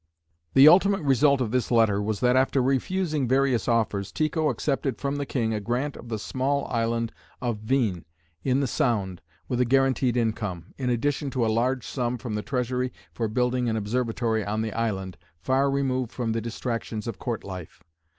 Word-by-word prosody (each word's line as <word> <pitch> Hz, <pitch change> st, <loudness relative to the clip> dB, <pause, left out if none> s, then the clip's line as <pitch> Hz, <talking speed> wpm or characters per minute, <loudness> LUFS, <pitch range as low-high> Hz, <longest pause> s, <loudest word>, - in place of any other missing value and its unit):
The 135 Hz, +2 st, +9 dB
ultimate 195 Hz, +2 st, +5 dB
result 140 Hz, 0 st, +4 dB
of 115 Hz, -4 st, -1 dB
this 125 Hz, -2 st, 0 dB
letter 110 Hz, -4 st, +3 dB
was 105 Hz, +1 st, -2 dB
that 125 Hz, 0 st, +4 dB
after 130 Hz, +1 st, +3 dB
refusing 150 Hz, +2 st, 0 dB
various 130 Hz, -2 st, +2 dB
offers, 105 Hz, -4 st, 0 dB
Tycho 155 Hz, 0 st, 0 dB
accepted 135 Hz, +1 st, -1 dB
from 140 Hz, +1 st, -2 dB
the 140 Hz, -1 st, -3 dB
king 115 Hz, -4 st, 0 dB
a 105 Hz, -, -1 dB
grant 125 Hz, +7 st, -2 dB
of 120 Hz, -, -11 dB
the 110 Hz, -, -2 dB
small 135 Hz, +6 st, -1 dB
island 115 Hz, -1 st, 0 dB, 0.3 s
of 120 Hz, -4 st, -2 dB
Hveen, 110 Hz, -9 st, 0 dB, 0.4 s
in 130 Hz, +1 st, +2 dB
the -, -, +1 dB
Sound, 100 Hz, -7 st, 0 dB, 0.3 s
with 125 Hz, -1 st, 0 dB
a -, -, +6 dB
guaranteed 130 Hz, -1 st, +2 dB
income, 105 Hz, -7 st, -2 dB
in 130 Hz, -2 st, -1 dB
addition 140 Hz, +4 st, 0 dB
to 130 Hz, -3 st, 0 dB
a 110 Hz, -, +1 dB
large 125 Hz, +2 st, 0 dB
sum 125 Hz, -2 st, -2 dB
from 115 Hz, -2 st, -5 dB
the 105 Hz, -, -1 dB
treasury 125 Hz, 0 st, -1 dB, 0.2 s
for 115 Hz, -, -1 dB
building 125 Hz, +2 st, 0 dB
an 110 Hz, -, 0 dB
observatory 115 Hz, 0 st, -1 dB
on 105 Hz, +2 st, -1 dB
the 110 Hz, -, -3 dB
island, 95 Hz, -5 st, -2 dB, 0.2 s
far 135 Hz, -, +2 dB
removed 130 Hz, -3 st, 0 dB
from 120 Hz, -3 st, -2 dB
the 115 Hz, 0 st, -1 dB
distractions 115 Hz, -1 st, -4 dB
of 115 Hz, -4 st, -5 dB
court 120 Hz, -3 st, -3 dB
life. 90 Hz, -4 st, -9 dB
125 Hz, 185 wpm, -26 LUFS, 110-135 Hz, 0.4 s, The